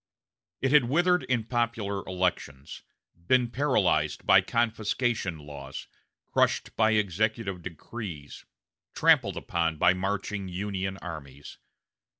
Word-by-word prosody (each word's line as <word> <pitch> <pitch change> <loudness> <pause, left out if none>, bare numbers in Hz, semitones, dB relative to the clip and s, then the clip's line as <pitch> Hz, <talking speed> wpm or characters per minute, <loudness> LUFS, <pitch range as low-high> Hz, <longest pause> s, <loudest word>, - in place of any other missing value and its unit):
It 130 - +1
had 150 -4 +6
withered 175 +7 +3
in 125 -3 0
popular 115 -4 -1
elections, 90 -7 -3 0.5
been 125 0 +3
paralyzed 140 +2 +1
by - - +7
confiscation 110 -4 -1
laws, 70 -2 -9 0.5
crushed - - +1
by 110 0 +3
executive 105 -1 0
decrees, 85 -2 -8 0.5
trampled - - +4
upon 80 -2 -1
by 90 +3 +5
marching 100 +1 -3
Union 95 +1 -3
armies. 70 -5 -9
100 Hz, 105 wpm, -28 LUFS, 85-115 Hz, 0.5 s, by